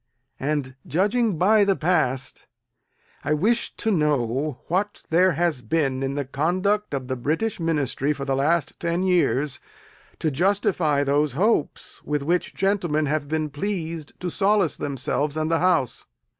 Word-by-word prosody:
And 140 Hz, -2 st, -2 dB
judging 205 Hz, -, +1 dB
by 205 Hz, +5 st, +5 dB
the 200 Hz, -1 st, +2 dB
past, 155 Hz, -7 st, -1 dB, 0.8 s
I 150 Hz, +2 st, +1 dB
wish 225 Hz, +9 st, 0 dB
to 225 Hz, -, -1 dB
know 145 Hz, -, 0 dB
what 200 Hz, +4 st, -1 dB
there 180 Hz, +2 st, +4 dB
has 165 Hz, -3 st, 0 dB
been 135 Hz, +2 st, 0 dB
in 135 Hz, 0 st, -2 dB
the 145 Hz, -1 st, -2 dB
conduct 185 Hz, +7 st, 0 dB
of 130 Hz, -2 st, -4 dB
the 130 Hz, -, -2 dB
British 160 Hz, -, -1 dB
Ministry 150 Hz, -4 st, 0 dB
for 140 Hz, -2 st, -4 dB
the 135 Hz, -1 st, 0 dB
last 150 Hz, +3 st, 0 dB
ten 170 Hz, +1 st, -1 dB
years 150 Hz, -7 st, +1 dB, 0.6 s
to 155 Hz, -, -1 dB
justify 170 Hz, -3 st, +1 dB
those 145 Hz, 0 st, +1 dB
hopes 185 Hz, -, 0 dB
with 150 Hz, -1 st, -2 dB
which 175 Hz, +4 st, 0 dB
gentlemen 180 Hz, -6 st, +1 dB
have 150 Hz, 0 st, -1 dB
been 155 Hz, 0 st, -2 dB
pleased 165 Hz, -2 st, -4 dB
to 180 Hz, -1 st, -3 dB
solace 195 Hz, -5 st, +2 dB
themselves 145 Hz, +2 st, -2 dB
and 155 Hz, +1 st, -1 dB
the 165 Hz, -, +3 dB
House? 170 Hz, -8 st, +1 dB
155 Hz, 150 wpm, -24 LUFS, 140-185 Hz, 0.8 s, by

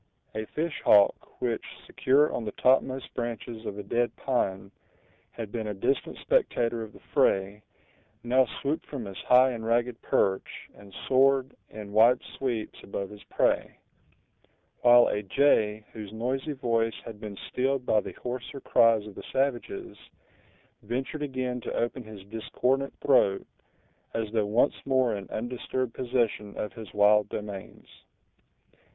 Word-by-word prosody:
A 110 Hz, 0 st, -3 dB
fish 160 Hz, +1 st, -3 dB
hawk, 100 Hz, -1 st, +4 dB
which, -, -, -1 dB, 0.2 s
secure 145 Hz, +3 st, +3 dB
on -, -, -2 dB
the 105 Hz, -, -4 dB
topmost 130 Hz, 0 st, +2 dB
branches 115 Hz, -1 st, -5 dB
of 100 Hz, -, -5 dB
a 105 Hz, -, -5 dB
dead 120 Hz, +3 st, 0 dB
pine, 95 Hz, -7 st, -1 dB, 0.6 s
had 110 Hz, -3 st, -7 dB
been 110 Hz, -2 st, -3 dB
a 105 Hz, -, -3 dB
distant 135 Hz, +8 st, -1 dB
spectator 120 Hz, -, +1 dB
of 110 Hz, -1 st, -7 dB
the -, -, -15 dB
fray, 100 Hz, +2 st, +2 dB, 0.6 s
now 125 Hz, +1 st, +3 dB
swooped 145 Hz, +6 st, -3 dB
from 135 Hz, -6 st, -5 dB
his 95 Hz, -1 st, -8 dB
high 130 Hz, +1 st, +5 dB
and 115 Hz, -2 st, -5 dB
ragged 120 Hz, +1 st, 0 dB
perch, 95 Hz, -1 st, 0 dB
and 100 Hz, -1 st, -15 dB, 0.2 s
soared, 135 Hz, 0 st, +3 dB
in 105 Hz, -2 st, -9 dB
wide 115 Hz, +4 st, +6 dB, 0.2 s
sweeps, 120 Hz, -5 st, -3 dB
above 100 Hz, 0 st, -5 dB
his 105 Hz, -1 st, -12 dB
prey; -, -, 0 dB, 1.0 s
while 120 Hz, 0 st, +7 dB
a 105 Hz, -, -1 dB
jay, 105 Hz, -2 st, +2 dB
whose 105 Hz, -3 st, -8 dB
noisy 130 Hz, +6 st, -2 dB
voice 115 Hz, -4 st, 0 dB
had 110 Hz, -2 st, -9 dB
been 105 Hz, -3 st, -7 dB
stilled 130 Hz, 0 st, 0 dB
by 110 Hz, -, +3 dB
the -, -, -6 dB
hoarser 125 Hz, +3 st, -6 dB
cries 115 Hz, -4 st, +4 dB
of 105 Hz, -, -9 dB
the -, -, -9 dB
savages, 135 Hz, -2 st, -2 dB, 0.9 s
ventured 135 Hz, +5 st, -4 dB
again 130 Hz, -3 st, -2 dB
to -, -, -5 dB
open 120 Hz, +2 st, -1 dB
his 105 Hz, -3 st, -11 dB
discordant 125 Hz, +6 st, -1 dB
throat, 100 Hz, -8 st, +3 dB, 0.7 s
as 110 Hz, -2 st, -2 dB
though 110 Hz, -2 st, +1 dB
once 115 Hz, +7 st, +2 dB
more 130 Hz, -4 st, +2 dB
in 100 Hz, -1 st, -7 dB
undisturbed 120 Hz, +1 st, -3 dB
possession 120 Hz, -5 st, -1 dB
of 105 Hz, -, -4 dB
his 110 Hz, -5 st, -9 dB
wild 105 Hz, 0 st, +4 dB
domains. 100 Hz, -2 st, -7 dB
115 Hz, 145 wpm, -28 LUFS, 105-130 Hz, 1.0 s, while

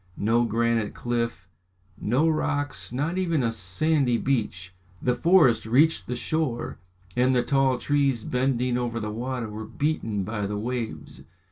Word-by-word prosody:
No 115 Hz, +3 st, +2 dB
granite 115 Hz, -1 st, 0 dB
cliff, 115 Hz, -5 st, -2 dB, 0.5 s
no 125 Hz, -, +1 dB
rocks, 145 Hz, -4 st, -1 dB
not 150 Hz, +9 st, -1 dB
even 170 Hz, -7 st, +1 dB
a 115 Hz, -, +1 dB
sandy 120 Hz, -, +1 dB
beach. 105 Hz, -8 st, -2 dB, 0.3 s
The 125 Hz, -, +1 dB
forest 145 Hz, -8 st, +4 dB
reached 145 Hz, +8 st, +3 dB
the 125 Hz, -, -2 dB
shore, 150 Hz, -7 st, -2 dB, 0.4 s
and 130 Hz, +1 st, +3 dB
the 125 Hz, -, +3 dB
tall 135 Hz, -1 st, +2 dB
trees 140 Hz, -4 st, +1 dB
bending 125 Hz, -1 st, 0 dB
over 120 Hz, -1 st, -2 dB
the 105 Hz, -1 st, -4 dB
water 120 Hz, +1 st, -3 dB
were 110 Hz, +1 st, -6 dB
beaten 115 Hz, -4 st, -1 dB
by 105 Hz, 0 st, -3 dB
the 105 Hz, +1 st, -3 dB
waves. 120 Hz, +1 st, -4 dB
120 Hz, 145 wpm, -26 LUFS, 115-140 Hz, 0.5 s, forest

